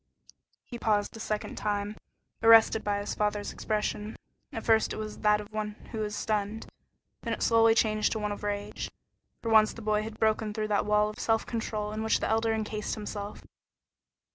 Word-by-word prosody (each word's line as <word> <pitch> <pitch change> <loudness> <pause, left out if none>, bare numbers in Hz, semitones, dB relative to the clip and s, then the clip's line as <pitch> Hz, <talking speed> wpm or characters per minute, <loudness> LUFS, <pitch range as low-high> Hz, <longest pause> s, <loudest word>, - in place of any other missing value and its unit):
He 240 - -8
paused 210 -2 +1
a - - -8
second 215 -1 -3
time, 205 0 -2 0.5
arrested 225 -1 +7
by 205 -1 0
his 205 - -3
father's 210 -1 -1
expression. 215 0 -2 0.4
At 225 - -6
first 220 -1 +3
it - - -4
was 215 -1 -6
that 210 -1 +4
of 210 +1 -10
one 210 -1 -3 0.2
who 220 -2 -2
is 210 0 -3
stunned, 210 +1 -2 0.6
then - - -2
it - - -3
slowly 225 -1 +5
changed 215 -1 +2
to - - -3
one 210 -1 -2
of 205 - -5
rage. 205 0 -3 0.5
For 230 - -1
once 215 -1 +6
the 230 - -10
boy 210 0 +2
had 220 0 -7
broken 215 -1 +1
through 215 -1 -2
that 205 0 +1
wall 210 0 +3
of - - -13
self 225 -1 +1
control 215 -2 -3
in 215 +1 -3
which 220 0 +2
the - - -1
Elder 225 0 +2
encased 215 -1 -2
himself. 205 -1 -6
215 Hz, 190 wpm, -29 LUFS, 210-220 Hz, 0.6 s, arrested